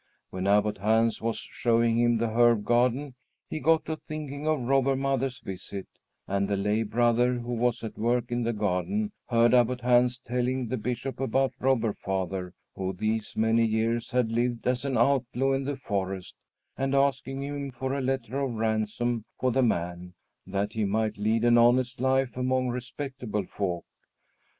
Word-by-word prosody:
When 95 +1 -3
Abbot 105 0 +2
Hans 110 +3 +2
was 115 0 -1
showing 115 -1 +1
him 120 -1 +3
the 115 0 0
herb 115 -2 +4
garden, 125 +4 +2 0.3
he 155 - -4
got 160 0 +3
to 160 0 -3
thinking 150 -1 -6
of 155 -3 +1
Robber 135 +1 +2
Mother's 135 -1 -1
visit, 95 -3 -7 0.4
and 100 0 0
the 100 0 0
lay 105 +3 +1
brother, 120 +2 +2
who 120 0 -4
was 120 0 0
at 110 - -6
work 120 +2 0
in 120 0 0
the 115 0 0
garden, 110 - -1 0.2
heard 120 -1 +4
Abbot 125 0 +3
Hans 125 0 +3
telling 125 0 -2
the 130 - -1
Bishop 125 +4 -4
about 135 +1 +1
Robber 120 -5 +2
Father, 95 -1 -3 0.2
who 95 0 -3
these 110 +3 -2
many 115 +1 +3
years 115 +1 0
had 125 -2 +1
lived 120 0 -1
as 125 +2 0
an 135 -2 0
outlaw 135 -1 +2
in 135 0 0
the 140 0 -2
forest, 95 -6 -3 0.4
and 135 +1 -1
asking 135 -1 +1
him 140 0 -4
for 130 +1 -4
a 140 - -1
letter 130 -1 -2
of 135 -4 -2
ransom 110 +1 -1
for 130 0 +2
the 130 +2 +2
man, 90 -5 -1 0.3
that 100 +2 -2
he 110 -2 -1
might 105 +1 0
lead 110 +2 +1
an 120 0 +6
honest 125 +2 +3
life 130 -1 +1
among 130 0 0
respectable 125 -4 -4
folk. 90 -3 -3
120 Hz, 170 wpm, -27 LUFS, 110-130 Hz, 0.4 s, an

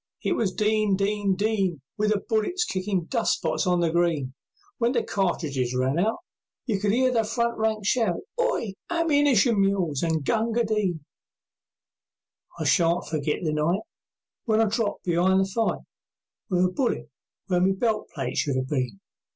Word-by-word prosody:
It - - 0
was 210 -5 +1
"Din! 215 0 +1
Din! 200 0 0
Din!" 195 -5 0 0.2
With 210 0 +1
the 205 -2 +1
bullet 225 - 0
kickin' 185 -2 -1
dust 230 +4 +1
spots - - -1
on 180 -1 +2
the 165 -1 +1
green; 165 -6 0 0.5
When 235 +1 +2
the 235 - +1
cartridges 145 -10 -1
ran 135 +5 +1
out, 220 +5 +1 0.5
You 215 -6 0
could 205 0 +1
hear 255 +3 +3
the 230 -2 +2
front 235 +1 -1
lines 220 -2 0
shout, 220 -5 +2 0.2
"Hi! 240 - 0 0.2
Ammunition 285 - +3
mules 190 -8 +1
an' 160 -2 0
Gunga 225 - +1
Din!" 200 -8 -1 1.5
I - - -3
shan't 170 +1 +3
forget 150 -1 -2
the 155 -2 0
night 155 +5 +1 0.6
When 220 -2 +2
I 225 - +5
dropped 220 -1 -1
be'ind 180 +2 +3
the 195 - +3
fight 225 +4 -1 0.7
With 180 -1 +3
a 180 - 0
bullet 250 +5 -1 0.3
where 180 -2 +1
my 190 +1 +4
belt 220 +2 -1
plate 135 -4 -4
should 140 -3 0
have 130 0 -2
been. 125 -8 -2
195 Hz, 165 wpm, -25 LUFS, 170-220 Hz, 1.5 s, I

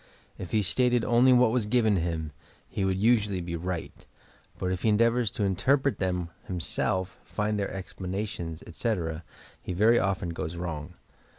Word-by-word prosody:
If 90 - -6
he 110 -1 +2
stated 125 +3 +2
only 120 +2 +5
what 125 -2 +5
was 115 -3 +1
given 110 -3 +3
him, 80 -3 -2 0.4
he - - -4
woald 95 -1 +1
usually 105 -2 +3
be 85 -1 -4
right, 85 0 -4 0.6
but 90 - -1
if 95 - -2
he 110 - +2
endeavours 115 +2 +3
to 105 - -3
interpret 130 +9 +2
them 90 -3 -1 0.2
himself, 95 +1 -2
find 105 0 -1
their 100 - -1
explanations, 95 -3 -5
etc., 85 -4 -2 0.4
he - - -4
very 110 +6 +5
often 95 -2 0
goes 80 0 -4
wrong. 85 -1 -5
95 Hz, 160 wpm, -28 LUFS, 85-110 Hz, 0.6 s, only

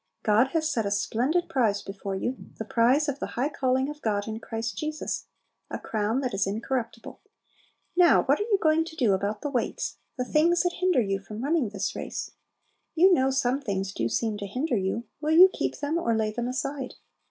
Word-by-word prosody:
God 220 +4 +4
has 320 -1 +1
set 240 -8 0
a 200 - -1
splendid 250 - 0
prize 235 -10 +1
before 195 0 -5
you, 245 +7 -2 0.2
"the 220 - -5
prize 250 +8 +3
of 285 -1 -2
the - - -3
high 265 +4 +1
calling 265 -2 +1
of 295 0 -7
God 205 -1 -1
in 220 0 -4
Christ 225 -2 -4
Jesus," 305 +6 -3 0.4
a - - -3
crown 220 +4 -1
that 255 -3 -2
is 195 0 0
incorruptible. 230 +4 -4 0.7
Now 350 -1 +6
what 280 +2 +2
are 420 +3 -2
you 405 - +4
going 315 -1 +3
to 325 - -10
do 240 -10 +3
about 200 +2 -1
the 290 - -3
weights, 245 -4 -2 0.2
the 250 - -1
things 330 +6 +3
that 355 0 0
hinder 365 -7 +3
you 195 -2 -1
from 210 +4 -8
running 290 -5 +1
this 200 -1 -3
race? - - -5 0.6
You 365 +3 +6
know 265 -5 +3
some 265 0 +1
things 195 -5 -2
do 115 - -1
seem 220 - -1
to 200 - -4
hinder 255 +7 -1
you; 195 +3 -1 0.2
will 315 +1 +2
you 370 +2 +10
keep - - -2
them 300 +3 -1
or 235 -9 +1
lay 220 -1 0
them 240 +2 -3
aside? 265 +1 -3
250 Hz, 210 wpm, -27 LUFS, 210-305 Hz, 0.7 s, you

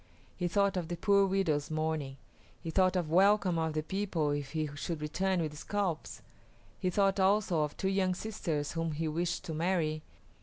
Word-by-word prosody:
He 180 - -1
thought 200 +2 +2
of 175 -3 -2
the 175 +1 -4
poor 200 +2 +4
widows 165 -7 0
mourning; 155 -3 -2 0.4
he 165 - -5
thought 185 +2 +3
of 170 -4 -1
welcome 190 -1 +4
of 160 -1 -1
the 155 0 -1
people 180 -4 -1
if 145 -1 -3
he 155 -1 0
should 155 +2 -4
return 185 +5 0
with 150 -1 -4
scalps; 185 0 -3 0.6
he 185 - 0
thought 195 +1 +2
also 190 -4 +3
of 150 -1 -2
two 190 - -1
young 190 -1 +1
sisters 165 -8 -3
whom 165 -1 -2
he 160 +2 -2
wished 170 +3 -1
to 160 - -4
marry. 160 -2 0
170 Hz, 185 wpm, -31 LUFS, 155-190 Hz, 0.6 s, poor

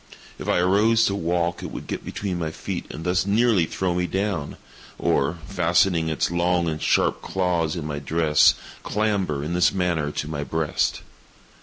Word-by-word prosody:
If - - -7
I - - +2
arose 105 +6 +4
to 100 - +1
walk 85 -2 -1
it - - -5
would - - -7
get - - -5
between 95 -4 -4
my 80 -2 -2
feet 80 - -5
and 80 - -7
thus 90 +1 +1
nearly 105 -4 +3
throw 95 -2 -1
me 90 0 0
down, 95 -6 -2 0.4
or, 70 +6 +1
fastening 85 -4 +2
its 80 +1 0
long 85 0 +1
and 80 -1 -3
sharp - - +2
claws 90 -4 0
in 85 -4 -4
my 75 -1 -3
dress, 75 +1 +4 0.3
clamber, 100 -9 -1
in 80 +3 -3
this 90 -1 +3
manner, 90 -6 0
to 75 - -4
my 75 -2 -3
breast. 80 0 -1
85 Hz, 175 wpm, -24 LUFS, 80-95 Hz, 0.4 s, arose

